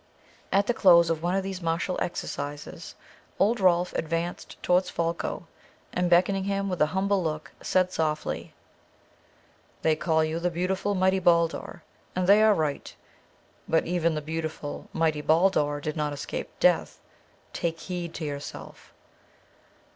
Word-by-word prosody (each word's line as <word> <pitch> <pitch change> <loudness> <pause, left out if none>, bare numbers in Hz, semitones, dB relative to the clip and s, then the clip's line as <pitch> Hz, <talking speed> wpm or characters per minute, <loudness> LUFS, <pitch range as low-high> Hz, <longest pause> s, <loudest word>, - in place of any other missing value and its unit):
At 200 +1 +3
the 240 - +1
close 170 -6 +6
of 160 -1 -2
one 175 +2 0
of 195 - 0
these 190 -1 -5
martial 170 +2 -1
exercises, 145 -3 -5 0.4
old 220 +4 +2
Rolf 180 -2 +3
advanced 165 +2 -3
towards 180 +1 +2
Folko, 170 +1 -2 0.5
and 180 0 +1
beckoning 190 +2 +3
him 200 0 -1
with 180 -2 -3
an 150 - +5
humble 190 +3 +1
look, 155 -2 -3
said 185 0 +1
softly, 155 -3 -2 1.3
"They 160 -1 +3
call 160 0 +1
you 155 +1 -2
the 175 +1 0
beautiful 185 +4 -1
mighty 190 0 +3
Baldur, 170 -2 +1 0.3
and 185 0 0
they 200 +3 +6
are 215 -1 +5
right. 155 -4 -2 0.7
But 165 - +2
even 170 -2 +1
the 150 - -2
beautiful 155 -1 -5
mighty 160 -2 0
Baldur 155 -2 +2
did 150 +1 -4
not 150 -2 -1
escape 140 - -5
death. - - +2 0.5
Take 165 -1 -2
heed 175 -2 -5
to 160 - -4
yourself." 145 -1 -8
170 Hz, 145 wpm, -27 LUFS, 160-185 Hz, 1.3 s, close